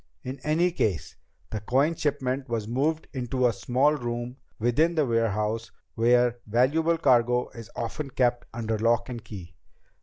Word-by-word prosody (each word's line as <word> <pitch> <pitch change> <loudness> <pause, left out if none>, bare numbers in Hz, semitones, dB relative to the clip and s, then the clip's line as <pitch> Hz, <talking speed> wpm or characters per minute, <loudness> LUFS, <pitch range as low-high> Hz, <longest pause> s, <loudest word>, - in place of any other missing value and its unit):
In 130 +2 -6
any 165 +4 +2
case, 105 - -1 0.4
the 110 - -2
coin 135 +10 +2
shipment 135 -4 -2
was 115 -3 -2
moved 150 +7 0
into 130 -1 -1
a 120 - +3
small 130 +7 +2
room 120 -2 -4 0.2
within 150 +9 +2
the 155 -3 +3
warehouse 115 -1 0 0.2
where 120 +1 +3
valuable 150 +9 +2
cargo 125 -4 +3
is 115 -4 -11
often 135 +5 -4
kept 120 -2 0
under 110 -2 -2
lock 120 +2 +2
and 120 -3 -6
key. 95 -6 -9
120 Hz, 150 wpm, -26 LUFS, 115-140 Hz, 0.4 s, a